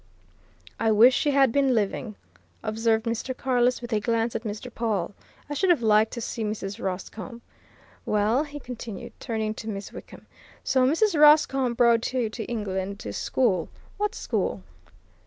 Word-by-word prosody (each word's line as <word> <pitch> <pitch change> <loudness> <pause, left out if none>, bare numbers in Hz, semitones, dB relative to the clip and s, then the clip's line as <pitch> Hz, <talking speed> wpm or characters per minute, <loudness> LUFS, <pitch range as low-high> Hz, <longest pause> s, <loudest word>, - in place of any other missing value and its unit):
"I 225 - +2
wish 225 +4 +6
she 295 - +1
had 275 -3 +4
been 275 -1 +2
living," 210 +1 -2 0.5
observed 225 +1 0
Mr. 235 +3 -3
Carless, 250 -1 +1
with 240 -1 -5
a 215 - +2
glance 230 +2 0
at 225 - -1
Mr. 225 +2 -6
Pawle. 205 -6 -2 0.3
"I 290 - -4
should 365 +6 +1
have 330 -9 +3
liked 215 0 +4
to 235 - -5
see 230 0 -4
Mrs. 210 0 -4
Roscombe. 215 +5 -5 0.6
Well," 215 +6 +1
he 290 -1 -8
continued, 235 -5 -8
turning 220 -3 -2
to 220 0 -7
Miss 200 -1 -6
Wickham, - - -11 0.4
"so 255 -1 +3
Mrs. 330 +3 +2
Roscombe 270 -5 +5
brought 235 0 +3
you 240 -4 0
to 225 - -5
England, 200 -3 -3
to 100 - -6
school. 190 - 0 0.3
What 420 0 -1
school?" - - -2
230 Hz, 160 wpm, -26 LUFS, 215-255 Hz, 0.6 s, wish